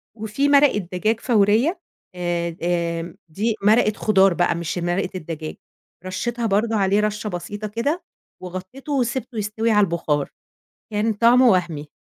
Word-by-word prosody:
وفي 220 +6 -1
مرقة 285 -5 +5
دجاج 205 +4 -1
فورية، 230 - +2 0.4
آآ، 170 -1 -2
آمم، 170 -1 -1
دي 210 +7 -1
مرقة 215 +1 +4
خُضار 195 -3 +3
بقى 175 0 +1
مش 170 +1 -4
مرقة 175 +2 -1
الدجاج، 160 -3 -6 0.5
رشيتها 235 +6 -3
برضه 220 +2 +1
عليه 200 0 +2
رشة 210 0 -1
بسيطة 205 +3 -5
كده، 280 - -2 0.4
وغطيتُه 185 - -7
وسِبته 250 -2 -2
يستوي 215 +2 -1
على 210 -1 +5
البُخار، 160 -5 -1 0.6
كان 215 +2 +1
طعمُه 240 +4 +5
وهمي. 170 -7 0
205 Hz, 135 wpm, -22 LUFS, 175-230 Hz, 0.6 s, مرقة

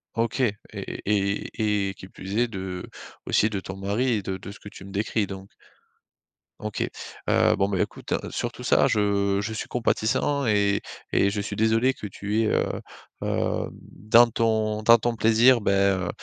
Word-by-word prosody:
OK, 115 +3 -1
et 105 -5 +2 0.2
et - - -7
et 100 0 0
et 95 - -5
qui 95 - -12
plus 95 +2 -6
est, 120 - +3
de 95 -4 -6 0.4
aussi 110 - +3
de 100 - -3
ton 95 0 -7
mari 105 +6 0
et 105 - 0
de 95 0 -3
de 95 - -9
ce 100 - -13
que 105 - -10
tu 95 - -12
me 95 - -10
décris 105 +1 -1
donc? 95 0 -8 1.1
OK, 105 -1 -2 0.4
heu, - - +4
bon, 100 - +1
ben, 95 -2 -1
écoute - - -3 0.2
surtout - - -4
ça - - +4
je 100 -1 +1
je 110 +2 -4
suis 110 - -5
compatissant 125 +4 0
et 100 -2 +2 0.3
et 100 - +4
je 105 +1 -3
suis 100 0 -4
désolé 115 +4 +3
que 105 - -9
tu 105 +2 -2
es, - - +1
heu, - - 0 0.4
hem, - - -1 0.2
dans 115 +3 +5
ton 110 -2 0
dans 115 +2 +8
ton 120 +1 -1
plaisir, 115 +3 +5
bah, 100 - +1
heu 95 -2 +2
105 Hz, 185 wpm, -25 LUFS, 100-110 Hz, 1.1 s, dans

